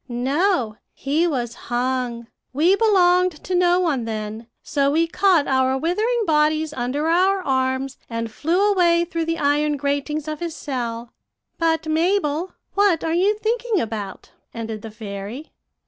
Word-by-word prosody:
"'No; 255 - 0 0.2
he 305 +5 0
was 245 -7 -2
hung. 245 -1 -2 0.3
We 330 +8 +4
belonged 365 -4 +3
to 370 - -4
no 355 0 +3
one 295 -10 0
then, 220 0 -5 0.2
so 280 -1 +1
we 320 +3 +2
caught 345 -2 +3
our 260 0 +2
withering 430 - 0
bodies 310 -1 +2
under 265 +4 -2
our 375 +3 +2
arms, 260 -1 -1
and 230 -1 -4
flew 355 - +1
away 345 -3 +3
through 335 -2 -3
the 330 0 -1
iron 295 0 +1
gratings 285 +2 -2
of 305 -1 -4
his 340 -2 -4
cell. 235 -3 -5 0.5
But, 325 -1 +1
Mabel, 325 +1 0 0.2
what 395 -5 +2
are 325 - -1
you 395 +5 +2
thinking 455 -1 0
about?' 215 -5 -5 0.2
ended 225 -2 -5
the 225 - -8
fairy. 210 +6 -7
300 Hz, 145 wpm, -22 LUFS, 250-355 Hz, 0.5 s, We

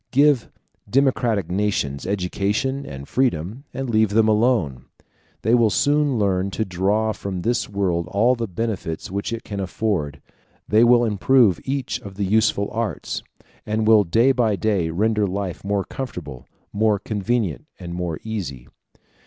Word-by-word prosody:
Give 140 -2 +3 0.4
democratic 120 - +1
nations 90 -9 -1
education 105 +8 -1
and 70 0 -8
freedom, 120 - -1
and 135 0 -4
leave 110 -2 +3
them 110 +2 +3
alone. 105 - +1 0.6
They 110 - +2
will 120 -2 +5
soon 145 +2 +2
learn 95 -2 +1
to 110 - 0
draw 100 +4 0
from 95 -4 -5
this 120 +1 0
world 90 -4 -1
all 115 +5 +3
the 115 -2 -3
benefits 95 -5 -4
which 100 +3 -3
it 115 -1 -4
can 100 -1 -6
afford; 90 -6 -2 0.5
they 110 +3 +4
will 120 0 +5
improve 110 -2 +3
each 135 -1 -2
of 100 -1 -10
the 100 0 -1
useful 100 0 +2
arts, 115 -2 -3 0.4
and 110 +1 -1
will 110 -1 +6
day 115 +9 +3
by 120 -5 +2
day 100 -5 0
render 105 +4 +1
life 95 -2 -4
more 100 0 0
comfortable, 85 - -7 0.3
more 105 0 +2
convenient, 105 - -2
and 85 -2 -7
more 85 -3 -3
easy. 85 - -5
105 Hz, 150 wpm, -22 LUFS, 95-115 Hz, 0.6 s, will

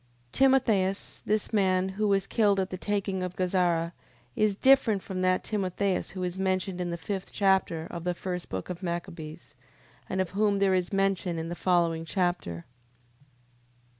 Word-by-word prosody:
Timotheus... 225 - +2
This 215 +2 0
man, 190 -2 +2
who 210 +2 -1
was 195 -1 +2
killed 205 -3 +2
at 190 0 -1
the - - -2
taking 195 -2 -1
of 180 -1 -4
Gazara, 175 -2 +1 0.4
is 215 -2 +2
different 235 -5 +4
from 185 -2 -4
that 185 0 +2
Timotheus 195 -2 -1
who 185 -1 -5
is 180 +1 -3
mentioned 185 -1 -1
in 175 - -2
the 170 - -3
fifth 190 +2 -5
chapter 190 -5 +2
of 170 - -6
the 180 0 -1
first 180 -1 -4
book 95 - -4
of 180 +1 -7
Machabees, 170 -3 -6 0.6
and 190 - -2
of 185 -3 0
whom 205 +1 +2
there 195 -1 +3
is 180 -1 0
mention 195 -3 0
in 165 0 -4
the 175 - -4
following 170 -2 +1
chapter. 175 - -2
185 Hz, 165 wpm, -28 LUFS, 175-195 Hz, 0.6 s, different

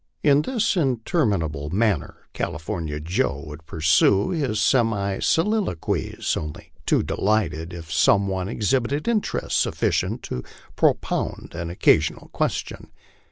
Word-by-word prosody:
In 145 -1 +5
this 225 +2 0
interminable 110 - 0
manner 100 -2 -1
California 85 -3 -3
Joe 75 -3 -1
would 75 +1 -10
pur 80 - -7
sue 85 +5 +4
his 135 -11 -1
semi 105 -4 +2
soliloquies, 190 - 0
only 75 -1 -6 0.2
too - - +3
delighted 90 -6 0
if 85 -3 -7
some 100 +4 +4
one 95 -1 -2
exhibited 130 - 0
interest 230 -3 0
suf - - 0
ficient - - 0
to 60 - -4 0.3
propound - - 0
an 85 0 -4
occasional 85 - +2
question. - - -2
100 Hz, 120 wpm, -23 LUFS, 80-130 Hz, 0.3 s, In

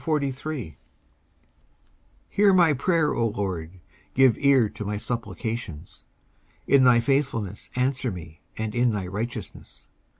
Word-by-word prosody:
19:143:001 140 - -2 1.6
Hear 200 -1 +4
my 175 -4 +5
prayer, 160 +2 +1
O 115 - +1
LORD, 95 -5 -4 0.4
give 130 -3 +5
ear 135 -5 +4
to 105 - -7
my 105 +1 -3
supplications: 105 -6 -5 0.6
in 140 -1 +5
thy 120 -2 +6
faithfulness 115 -6 -1
answer 130 0 0
me, 85 -4 -9 0.2
and 110 -1 -3
in 120 -1 +2
thy 100 -3 -2
righteousness. 105 +2 -7
120 Hz, 120 wpm, -25 LUFS, 105-140 Hz, 1.6 s, thy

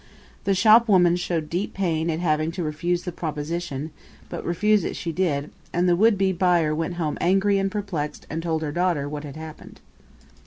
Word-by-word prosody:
The 195 - +2
shopwoman 205 -4 +5
showed 170 -3 -2
deep 180 +6 -3
pain 170 -4 0
at 160 0 -1
having 155 -2 +1
to 175 -1 -3
refuse 170 +3 -1
the 180 - -4
proposition, 155 -1 -4 0.4
but - - -5
refuse 210 +3 +2
it - - -3
she 170 - -4
did; 155 -5 -1 0.2
and 175 +1 +1
the 175 - +4
would 215 +3 +4
be 190 0 +2
buyer 175 -4 +2
went 165 +3 -2
home 160 -4 -2
angry 195 +3 +3
and 195 0 0
perplexed 190 -8 -4
and 160 +2 -4
told 160 -1 -1
her 150 - -2
daughter 175 -4 0
what 145 0 -5
had 140 - -8
happened. 155 0 -10
175 Hz, 190 wpm, -24 LUFS, 155-185 Hz, 0.4 s, shopwoman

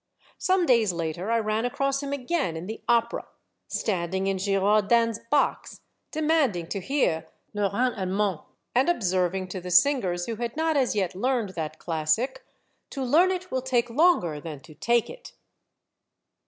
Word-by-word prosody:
Some 370 -1 +2
days 235 - +4
later 170 +3 -3
I 230 - +3
ran 215 0 0
across 275 +2 0
him 280 -1 -5
again 280 - -1
in 165 - -6
the 220 +3 -6
Opera, 235 0 +1 0.4
standing 190 -2 -1
in 195 0 0
Girardin's 210 +3 +2
box, 295 - 0 0.3
demanding 300 - +1
to 200 - -2
hear 180 - 0
" - - -45
le 205 -1 0
Rhin 245 +4 +1
Allemand," 190 -2 -1
^ - - -23 0.3
and 260 +6 +3
observing 185 - 0
to 185 0 -5
the 180 - -7
singers 180 -5 +3
who 230 -2 -4
had 235 +3 -4
not 320 0 +1
as 260 -5 +1
yet 190 -4 0
learned 235 +2 0
that 160 -4 -5
classic, 180 - -1 0.5
To 275 - -4
learn 320 +9 +4
it 370 -1 -3
will 260 - 0
take 245 -2 0
longer 230 - +3
than 155 -3 -7
to 165 0 -14
take 230 +9 +1
it - - -11
220 Hz, 170 wpm, -26 LUFS, 185-265 Hz, 0.5 s, days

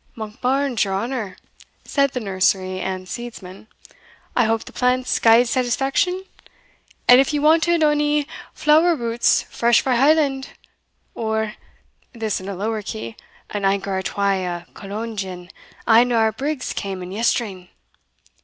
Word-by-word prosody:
"Monkbarns, 250 +4 -1
your 195 -2 -2
honour," 230 -1 -3 0.5
said 280 -1 +2
the 250 - -4
nursery 185 -2 0
and 185 0 -4
seedsman, 215 -4 -8 0.7
"I 240 - +3
hope 225 0 0
the - - -11
plants 250 0 +1
gied 230 +2 +6
satisfaction? 270 - 0 0.8
and 250 +1 +8
if 270 - 0
ye 295 - +1
wanted 320 +2 +3
ony 295 -1 +2 0.3
flower 320 +3 +4
roots 235 -3 +1
fresh 235 0 +2
frae 260 -2 +1
Holland, 275 -1 +2 0.6
or" 220 -1 -2 0.6
(this 220 -5 -2
in 190 - -7
a 200 - -4
lower 215 +3 -2
key) 115 - -6 0.4
"an 205 -1 -3
anker 195 0 0
or 190 - -1
twa 195 0 0
o' 175 -1 -4
Cologne 215 +3 -6
gin, 185 -2 -6 0.4
ane 235 +2 +5
o' - - +2
our 220 -1 +3
brigs 270 +4 -3
cam 190 -2 -4
in 180 - -8
yestreen." 200 -4 -1
225 Hz, 145 wpm, -21 LUFS, 195-265 Hz, 0.8 s, and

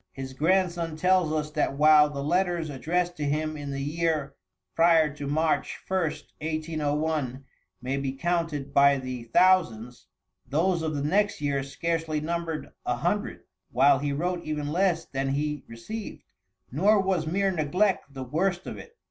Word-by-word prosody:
His 130 -1 -7
grandson 170 +1 +1
tells 180 -1 +3
us 155 -1 -2
that 150 -2 -1
while 150 0 +6
the 140 -1 -5
letters 175 0 0
addressed 175 +6 -1
to 150 - -3
him 155 +2 -1
in 145 -2 -6
the 140 0 -3
year 155 -2 -1 0.4
prior 165 -3 +4
to 145 -1 -6
March 155 +2 0
1st, 160 -5 -1 0.2
1801, 155 -3 -2 0.4
may 130 +2 -1
be 135 -1 -2
counted 150 -2 -2
by 140 0 +5
the 130 -2 -6
thousands, 125 -6 +2 0.4
those 165 +6 0
of 160 -1 -2
the 140 - -2
next 200 +7 +1
year 140 -2 0
scarcely 160 +2 -2
numbered 165 0 -3
a - - 0
hundred, - - -2 0.3
while 135 +1 +4
he 145 0 -1
wrote 175 +4 -2
even 150 -1 -3
less 175 -1 +1
than 135 0 -2
he 150 +1 -2
received. 205 - -7 0.5
Nor 200 - +4
was 190 -4 0
mere 195 +4 +1
neglect 180 +2 0
the 135 -1 -6
worst 175 +7 -1
of - - -6
it. 465 - -13
155 Hz, 155 wpm, -27 LUFS, 140-170 Hz, 0.5 s, while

